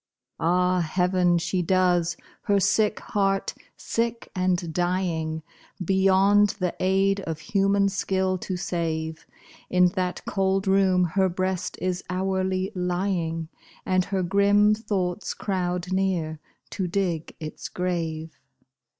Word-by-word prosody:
Ah, 180 +2 +2
heaven, 180 +1 +2
she 175 +2 -1
does! 175 -1 +2 0.3
her 200 -1 +3
sick 210 +2 +2
heart, 195 -1 0 0.2
sick 230 0 -2
and 180 -3 0
dying, 170 -3 -1 0.4
Beyond 195 +2 +4
the 180 -3 -1
aid 195 +1 +2
of 160 -5 -4
human 200 +1 +2
skill 190 -1 0
to 185 0 -4
save, 160 -3 -3 0.4
In 180 0 +4
that 180 -1 -3
cold 195 0 0
room 190 -1 +4
her 190 +2 +2
breast 185 0 -2
is 185 0 -2
hourly 190 +1 -1
lying, 175 -3 -1 0.4
And 185 -1 +2
her 190 -2 -1
grim 200 +3 +4
thoughts 205 -3 -2
crowd 180 -2 -2
near 180 -5 0 0.3
to 185 - -2
dig 175 -4 -2
its 155 -1 -7
grave. 165 -3 -3
185 Hz, 115 wpm, -25 LUFS, 175-195 Hz, 0.4 s, Beyond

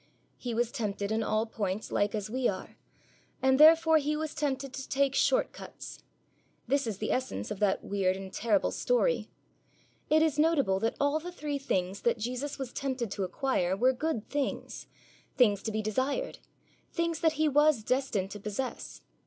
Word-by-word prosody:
He 240 -2 -4
was 240 0 +1
tempted 205 -5 -3
in 220 +1 +1
all 215 0 +1
points 210 -2 -3
like 205 +1 +1
as 210 -1 -3
we 250 +3 0
are; 185 - -4 0.6
and 265 0 +3
therefore 320 +1 +7
He 300 +1 -1
was 315 0 -3
tempted 275 -2 -2
to 270 - -6
take 275 -1 +2
short - - +2
cuts. - - -10 0.7
This 280 -2 +1
is 215 -4 -3
the 215 - -2
essence 180 - -2
of 200 - -4
that 205 -2 +1
weird 190 -2 0
and 190 -1 -8
terrible 210 -3 +1
story. - - +1 0.8
It 315 +1 +5
is 305 -2 +1
notable 290 -12 +3
that 225 +3 0
all 285 +2 +2
the 350 +3 -7
three 295 -4 -4
things 190 -7 -1
that 235 - +2
Jesus 250 +6 -3
was 265 -3 -6
tempted 260 -6 -3
to 200 - -2
acquire 190 -4 0
were 255 +4 +4
good 260 -5 -2
things, 285 -2 -3 0.5
things 205 -6 +4
to 220 - -3
be 215 0 -2
desired, 260 - -1 0.5
things 335 -1 -1
that 325 -2 +3
He 310 +1 +1
was 295 -4 +4
destined 220 -6 0
to 205 - -7
possess. 210 +6 -5
255 Hz, 180 wpm, -30 LUFS, 210-295 Hz, 0.8 s, therefore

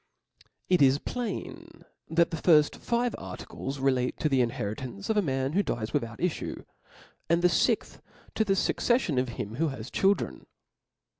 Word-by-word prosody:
It 180 -3 +3
is 135 0 +6
plain 235 +6 -6 0.2
that 170 +2 +3
the 165 - -2
firft 150 -2 +4
five 240 0 0
articles 135 +1 -6
relate 130 -2 +1
to 155 - +1
the 135 -2 +3
inheritance 120 - -3
of 220 - 0
a - - +5
man 135 -4 -1
who 200 - +3
dies 115 - -3
without 115 -1 -2
ifiue; 180 -2 -3 0.6
and 170 +1 +3
the 180 - +6
fixth, 160 - +1 0.3
to 220 - +2
the 195 -2 +1
fuccefilon 195 - +1
of 125 0 -1
him 110 -1 -5
who 165 +2 +2
has 130 -4 -6
children. 195 +1 0
150 Hz, 160 wpm, -28 LUFS, 130-185 Hz, 0.6 s, is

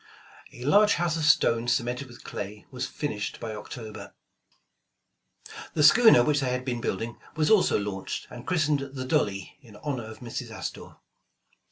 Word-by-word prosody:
A 120 - -10
large 205 +7 +5
house 170 -2 0
of 160 -2 -1
stone 115 -6 +4
cemented 125 +2 0
with 120 - -14
clay, 105 +1 -7
was 125 - -3
finished 110 -9 -4
by 110 -2 -5
October. 110 -1 -8 1.6
The 150 - +3
schooner 220 - +8
which 145 +2 +2
they 135 -2 0
had 125 0 -2
been 120 -3 -2
building, 115 +3 -3 0.2
was 155 +2 +2
also 215 -3 +5
launched 100 -2 -4
and 120 0 -10
christened 155 -5 +2
''Th 135 -1 -6
e - - -6
Dolly," 100 -5 -1
in 115 -6 -16
honor 130 -1 -4
of 110 0 -9
Mrs. 120 -2 -6
Astor. - - -7
125 Hz, 165 wpm, -27 LUFS, 110-150 Hz, 1.6 s, schooner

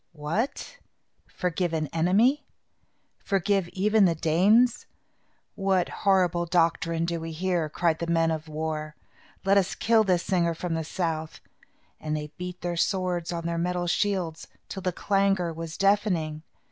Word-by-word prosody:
"What! 170 - -3 0.5
forgive 180 -1 -2
an 155 -1 0
enemy? 220 - +2 0.7
Forgive 195 -1 0
even 210 +2 +3
the 170 -2 +2
Danes? 200 +10 +3 0.7
What 195 -3 +1
horrible 180 -3 +1
doctrine 165 -1 +1
do 170 0 -2
we 165 0 -6
hear!" 175 -1 -1
cried 160 +1 0
the 170 - -3
men 165 -1 +2
of 160 0 -4
war. 155 0 -4 0.5
"Let 195 +1 +5
us 190 - -2
kill 225 -1 +3
this 180 -4 +1
singer 170 -3 +1
from 175 +1 -3
the 160 0 -1
south." 160 -1 -3 0.6
And 155 0 -2
they 150 0 -7
beat 180 0 -6
their 175 -1 -3
swords 180 -2 0
on 170 -1 -4
their 170 0 -1
metal 180 +1 -1
shields, 175 -3 -1 0.2
till 190 - -6
the 185 - -1
clangor 195 -2 +1
was 165 0 -7
deafening. 195 -7 +1
175 Hz, 145 wpm, -26 LUFS, 165-195 Hz, 0.7 s, Let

